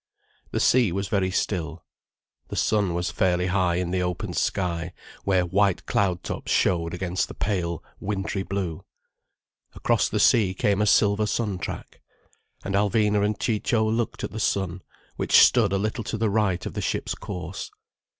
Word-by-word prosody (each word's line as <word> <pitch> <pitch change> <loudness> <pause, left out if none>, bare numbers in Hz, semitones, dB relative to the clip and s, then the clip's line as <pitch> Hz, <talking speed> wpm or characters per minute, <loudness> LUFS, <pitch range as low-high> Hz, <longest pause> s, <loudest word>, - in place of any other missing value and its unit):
The - - -2
sea 120 -7 +4
was 100 +2 -3
very 95 -3 +1
still. 85 -3 -2 0.6
The - - -6
sun 100 -5 +1
was 85 -1 -1
fairly 90 +1 +1
high 90 -2 +1
in 90 0 -1
the 90 0 0
open 90 -1 -3
sky, 85 -2 -1 0.3
where 95 -2 +2
white 95 +1 +1
cloud 90 -3 0
tops - - -5
showed 85 -1 +1
against 90 0 -1
the - - -10
pale, 85 -5 -2 0.2
wintry 100 -1 -2
blue. 95 -4 -4 0.9
Across - - +1
the - - -1
sea 100 -5 +4
came 100 +2 +1
a 105 - +2
silver 105 +1 +3
sun 105 -4 -1
track. 85 - -7 0.6
And 100 - -3
Alvina 105 +1 +2
and 105 -1 0
Ciccio 110 0 +1
looked 115 +1 -1
at - - -3
the 110 - -5
sun, 95 -3 -1 0.4
which - - +4
stood 110 -6 +4
a 100 - +1
little 110 +3 -2
to 110 - -3
the 110 -1 0
right 95 -4 +1
of - - -5
the - - -3
ship's - - -2
course. 90 -1 -6
95 Hz, 170 wpm, -25 LUFS, 90-105 Hz, 0.9 s, sea